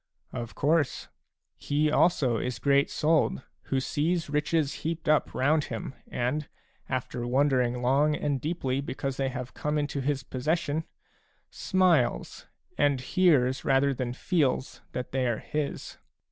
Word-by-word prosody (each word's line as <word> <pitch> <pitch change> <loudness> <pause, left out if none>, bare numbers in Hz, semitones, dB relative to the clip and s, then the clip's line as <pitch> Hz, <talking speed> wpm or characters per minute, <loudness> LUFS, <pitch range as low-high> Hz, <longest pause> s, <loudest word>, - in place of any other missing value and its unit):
" - - -37
Of 115 -1 -8
course; 150 -2 +1 0.5
he 150 +1 +1
also 140 -8 +3
is 125 +1 -3
great 140 +3 +3
souled, 155 -3 +1 0.2
who 135 - 0
sees 155 +4 -1
riches 150 0 +1
heaped 165 0 -3
up 155 0 +3
round 150 +3 +2
him 115 +2 -5
and, 140 +5 -2 0.4
after 125 -1 -3
wondering 125 -2 +2
long 145 +4 +3
and 145 -3 -1
deeply 140 -4 -1
because 135 -1 -4
they 135 -1 0
have 130 -1 -6
come 150 0 -2
into 145 -1 -1
his 135 0 -1
possession, 155 +4 -1 0.7
smiles, 175 - +1 0.3
and 145 -2 +3
hears 130 -3 +2
rather 135 +1 +3
than 125 -2 -3
feels 140 -3 0
that 125 - -4
they 130 -1 0
are 115 -2 0
his. 150 +3 -4
140 Hz, 140 wpm, -28 LUFS, 130-150 Hz, 0.7 s, also